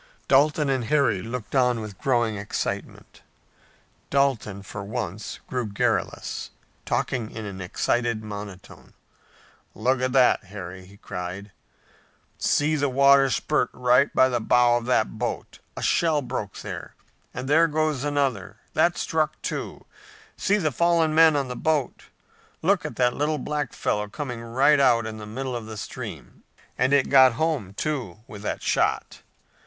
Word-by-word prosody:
Dalton 150 Hz, +2 st, +3 dB
and 130 Hz, -3 st, 0 dB
Harry 130 Hz, -8 st, +2 dB
looked 115 Hz, 0 st, -6 dB
on 125 Hz, -3 st, +3 dB
with 105 Hz, -3 st, -8 dB
growing 120 Hz, -5 st, +1 dB
excitement. 100 Hz, 0 st, -5 dB, 0.9 s
Dalton, 130 Hz, -8 st, 0 dB
for 100 Hz, +1 st, -7 dB
once, 105 Hz, -2 st, -5 dB
grew 125 Hz, -3 st, -3 dB
garrulous, 100 Hz, 0 st, -2 dB, 0.4 s
talking 115 Hz, -4 st, -1 dB
in 110 Hz, -2 st, -7 dB
an 95 Hz, -2 st, -7 dB
excited 115 Hz, +4 st, -1 dB
monotone. 100 Hz, -3 st, -9 dB, 0.8 s
"Look 125 Hz, +3 st, +1 dB
at 130 Hz, 0 st, 0 dB
that, 125 Hz, -6 st, +4 dB
Harry!" 95 Hz, -1 st, -9 dB
he 100 Hz, +1 st, -16 dB
cried. 90 Hz, +2 st, -6 dB, 0.9 s
"See 150 Hz, +2 st, +2 dB
the 145 Hz, -1 st, +1 dB
water 140 Hz, +1 st, +5 dB
spurt 150 Hz, +4 st, 0 dB
right 125 Hz, +2 st, +3 dB
by 130 Hz, -, +4 dB
the 125 Hz, -2 st, -1 dB
bow 120 Hz, +1 st, +4 dB
of 120 Hz, 0 st, -5 dB
that 110 Hz, -3 st, +1 dB
boat! 120 Hz, -, -4 dB, 0.2 s
A -, -, -4 dB
shell 155 Hz, -4 st, +2 dB
broke 120 Hz, -6 st, -5 dB
there! -, -, -7 dB, 0.4 s
And 125 Hz, +1 st, -6 dB
there 160 Hz, +4 st, +5 dB
goes 155 Hz, -3 st, 0 dB
another! 140 Hz, -10 st, -1 dB, 0.2 s
That -, -, +2 dB
struck, -, -, -1 dB
too! -, -, -5 dB, 0.5 s
See 205 Hz, -, +1 dB
the 155 Hz, -7 st, 0 dB
fallen 165 Hz, +2 st, +2 dB
men 160 Hz, -1 st, +6 dB
on 140 Hz, -2 st, 0 dB
the 125 Hz, -, -5 dB
boat! 150 Hz, -2 st, -1 dB, 0.6 s
Look 185 Hz, 0 st, +2 dB
at 150 Hz, -, -5 dB
that 125 Hz, -1 st, +2 dB
little 150 Hz, +1 st, 0 dB
black 150 Hz, +1 st, -3 dB
fellow 105 Hz, 0 st, -1 dB
coming 125 Hz, +1 st, -6 dB
right 130 Hz, +5 st, +3 dB
out 120 Hz, -4 st, +4 dB
in 110 Hz, 0 st, -6 dB
the 105 Hz, -1 st, -8 dB
middle 130 Hz, +3 st, -4 dB
of 115 Hz, -2 st, -6 dB
the 110 Hz, -1 st, -7 dB
stream! 100 Hz, -, -8 dB, 0.3 s
And 130 Hz, +2 st, +1 dB
it 140 Hz, -2 st, +4 dB
got 130 Hz, -3 st, +7 dB
home, 130 Hz, -, -2 dB
too, 125 Hz, -, -3 dB
with 105 Hz, -1 st, -10 dB
that 105 Hz, -, -4 dB
shot! -, -, 0 dB
125 Hz, 155 wpm, -25 LUFS, 110-140 Hz, 0.9 s, got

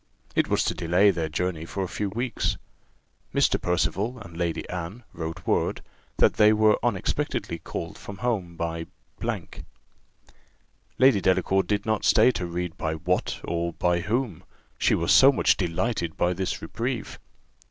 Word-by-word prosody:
It -, -, +3 dB
was -, -, +2 dB
to -, -, 0 dB
delay 90 Hz, +4 st, +3 dB
their 85 Hz, -4 st, -2 dB
journey 85 Hz, +1 st, -2 dB
for 95 Hz, +3 st, -4 dB
a -, -, -2 dB
few 105 Hz, +3 st, -3 dB
weeks. 120 Hz, +5 st, -2 dB, 0.8 s
Mr. -, -, +3 dB
Percival 100 Hz, +7 st, 0 dB
and 85 Hz, -7 st, -11 dB
Lady 85 Hz, -1 st, -2 dB
Anne 90 Hz, +7 st, -6 dB
wrote 80 Hz, +1 st, -6 dB
word, -, -, 0 dB, 0.3 s
that -, -, +4 dB
they 105 Hz, 0 st, +7 dB
were 110 Hz, 0 st, +4 dB
unexpectedly 100 Hz, -6 st, -1 dB
called -, -, -6 dB
from 100 Hz, -, -9 dB
home 100 Hz, -7 st, -2 dB
by. 85 Hz, 0 st, -3 dB, 2.1 s
Lady 130 Hz, -6 st, +5 dB
Delacour 95 Hz, +1 st, +2 dB
did 100 Hz, 0 st, -1 dB
not 110 Hz, -1 st, 0 dB
stay 115 Hz, +4 st, +5 dB
to 90 Hz, -7 st, -3 dB
read 85 Hz, 0 st, -4 dB
by 80 Hz, 0 st, -1 dB
what, 90 Hz, +3 st, -1 dB
or 85 Hz, 0 st, -2 dB
by 90 Hz, +1 st, +1 dB
whom, 110 Hz, -1 st, -2 dB, 0.4 s
she -, -, +3 dB
was -, -, 0 dB
so 135 Hz, -, +8 dB
much 135 Hz, -, +3 dB
delighted 90 Hz, -1 st, -2 dB
by 90 Hz, +1 st, +2 dB
this 95 Hz, +1 st, -3 dB
reprieve. 120 Hz, 0 st, -4 dB
90 Hz, 150 wpm, -26 LUFS, 85-110 Hz, 2.1 s, so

